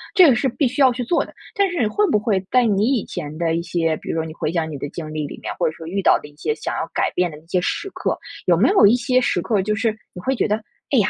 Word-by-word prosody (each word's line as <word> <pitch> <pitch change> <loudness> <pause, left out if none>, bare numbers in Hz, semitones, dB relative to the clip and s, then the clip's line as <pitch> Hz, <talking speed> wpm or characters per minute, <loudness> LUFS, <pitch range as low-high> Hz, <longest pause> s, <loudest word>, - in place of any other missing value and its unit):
这 365 -4 +8
个 260 - +5
是 265 +2 +1
必 265 +3 +1
须 255 +4 -2
要 260 -2 +7
去 245 +1 -3
做 290 +8 +1
的。 - - -12 0.2
但 400 -1 +2
是 350 - -3
你 235 - +3
会 410 - +1
不 215 - +3
会 205 -3 0
在 250 -1 +4
你 205 -1 +2
以 220 - -2
前 150 +1 -6
的 165 -1 0
一 170 - 0
些 165 -2 0
比 - - -10
如 - - -1
说 160 -1 -1
你 155 - -7
回 155 - -2
想 165 -2 -1
你 145 - -5
的 145 - -4
经 155 0 -7
历 155 -1 -2
里 - - -9
面， - - -3
或 - - +2
者 - - -8
说 160 - -9
遇 195 +4 -2
到 - - +5
的 - - -11
一 145 - -19
些 450 - -2
想 - - -4
要 - - -3
改 - - 0
变 180 0 0
的 150 - -10
一 155 - -18
些 180 +1 0
时 395 - -2
刻， - - -2 0.3
有 - - +4
没 - - +4
有 235 - +6
一 230 - +5
些 250 +1 +2
时 175 - 0
刻 210 -4 +1
就 210 +2 -1
是 220 -1 0 0.2
你 180 - -8
会 265 0 +1
觉 - - +1
得， 210 - +2 0.3
哎 270 - +2
呀，， 210 -1 +3
205 Hz, 355 characters per minute, -21 LUFS, 165-250 Hz, 0.3 s, 这